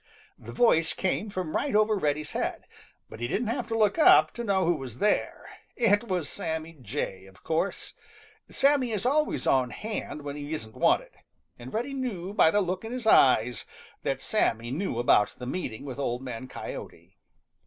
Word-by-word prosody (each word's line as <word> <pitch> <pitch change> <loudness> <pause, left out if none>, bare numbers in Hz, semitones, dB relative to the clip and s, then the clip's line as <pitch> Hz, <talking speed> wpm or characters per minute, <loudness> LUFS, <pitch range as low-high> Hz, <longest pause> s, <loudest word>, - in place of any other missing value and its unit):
The - - -10
voice 165 -10 +3
came 200 +3 -1
from 185 -5 -4
right 285 -6 0
over 215 0 +4
Reddy's 150 -4 -1
head, - - -3 0.4
but - - -11
he 120 - -2
didn't 220 - -1
have 230 - -2
to 225 - -2
look 215 +6 +2
up 155 - +7
to 235 - -5
know 195 -4 +1
who 175 - +3
was 130 -7 -7
there. 210 +6 0 0.3
It 230 -1 +2
was 180 -6 -1
Sammy 160 0 -4
Jay, 100 -5 -4
of 95 0 -19
course. 165 +5 -2 0.6
Sammy 275 -4 +2
is 210 +1 -2
always 300 +4 +1
on 130 -2 +3
hand 210 - -5
when 145 0 -5
he 145 +1 -5
isn't 110 -7 -8
wanted, - - +2 0.5
and 120 +1 -9
Reddy 245 +5 -2
knew 205 -9 -4
by 205 - +5
the 205 +5 +2
look 185 +1 -2
in 225 - -6
his 250 -2 -5
eyes 125 - +4 0.3
that 135 -1 -2
Sammy 120 - 0
knew 160 -3 -2
about 110 -4 +3
the 125 - -7
meeting 130 -5 -4
with 135 -1 -6
Old 125 -2 -2
Man 125 0 -6
Coyote. - - -9
170 Hz, 185 wpm, -27 LUFS, 130-215 Hz, 0.6 s, up